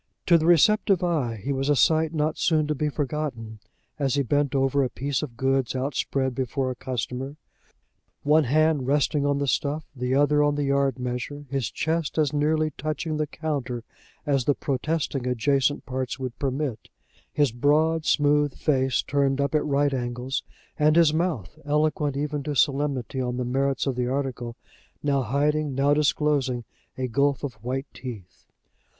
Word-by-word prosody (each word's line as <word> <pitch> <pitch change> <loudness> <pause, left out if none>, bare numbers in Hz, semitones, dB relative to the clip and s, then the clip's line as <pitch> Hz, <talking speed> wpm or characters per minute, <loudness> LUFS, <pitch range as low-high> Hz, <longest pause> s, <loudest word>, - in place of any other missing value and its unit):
To 170 - +6
the 160 - 0
receptive 190 +2 +4
eye 150 -10 0
he 140 - -1
was 135 +1 -1
a 145 - +4
sight 160 +1 +3
not 155 -1 -1
soon 155 -3 +2
to 150 - 0
be 150 +1 -1
forgotten, 135 -7 -4 0.4
as 135 -2 +1
he 140 - +2
bent 145 +2 0
over 135 +1 +2
a 130 - 0
piece 140 +1 -2
of 120 -6 -7
goods 135 -1 +1
outspread 130 0 -1
before 130 +1 -2
a - - -5
customer, 130 +2 -4 0.9
one 150 +1 +4
hand 150 0 +2
resting 145 0 +2
on 145 -1 +1
the 140 - 0
stuff, 145 +4 -1
the 125 0 -1
other 145 +1 +4
on 145 0 +2
the 145 - -1
yard 140 -2 +1
measure, 125 +3 -4
his 135 -3 -1
chest 160 -1 -2
as 150 -2 +2
nearly 155 +1 +1
touching 155 +1 -2
the 155 0 -1
counter 140 -7 -3 0.4
as 135 -4 +1
the 145 - +3
protesting 140 -1 -2
adjacent 135 +3 +1
parts 130 -1 -3
would 130 -2 -6
permit, 135 -4 -3 0.4
his 145 -5 +2
broad 155 +6 +2
smooth 145 -2 +2
face 135 -4 +1
turned 140 -1 +1
up 140 +1 0
at 155 - +2
right 145 -1 +1
angles, 125 +1 -2 0.4
and 150 +1 +4
his 165 -3 +5
mouth, 155 - -2
eloquent 150 -1 0
even 150 0 -2
to 145 +1 -3
solemnity 135 -2 0
on 125 -1 -2
the 125 - -2
merits 135 +2 0
of 135 -3 -1
the 125 0 -1
article, 125 -3 -3 0.5
now 140 -2 +2
hiding, 145 +3 0
now 140 +2 +3
disclosing 145 -4 +1 0.3
a 130 -1 -1
gulf 140 +4 +1
of 140 -4 -3
white 130 +3 -2
teeth. 110 -8 -9
140 Hz, 170 wpm, -25 LUFS, 130-150 Hz, 0.9 s, To